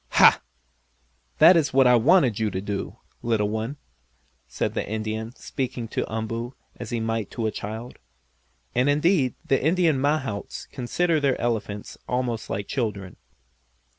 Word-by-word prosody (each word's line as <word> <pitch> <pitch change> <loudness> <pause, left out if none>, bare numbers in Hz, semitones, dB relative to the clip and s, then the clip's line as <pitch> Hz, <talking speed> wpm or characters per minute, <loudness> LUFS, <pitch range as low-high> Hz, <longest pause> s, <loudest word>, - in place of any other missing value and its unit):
"Ha! - - +7 1.0
That 180 - +8
is 145 -6 +2
what 135 -1 +6
I 125 0 +6
wanted 125 - +4
you 110 -1 +1
to 95 -2 -3
do, 100 0 -4 0.2
little 110 -3 +1
one," 110 +6 -3 0.7
said - - -2
the - - -1
Indian, 110 +2 -4
speaking 125 -5 -4
to - - -3
Umboo 115 +3 -4 0.2
as 120 - -7
he 120 -1 -2
might 115 -2 -2
to 115 - -4
a 110 - +1
child. 110 +4 -7 0.7
And 125 +3 +2
indeed 150 -2 +2
the 135 - +1
Indian 160 -3 +2
mahouts 140 -8 -2
consider 160 +6 0
their 140 -3 +1
elephants 105 -3 -3
almost 125 -3 -2
like 100 +1 -3
children. 105 - -3
120 Hz, 145 wpm, -25 LUFS, 110-135 Hz, 1.0 s, That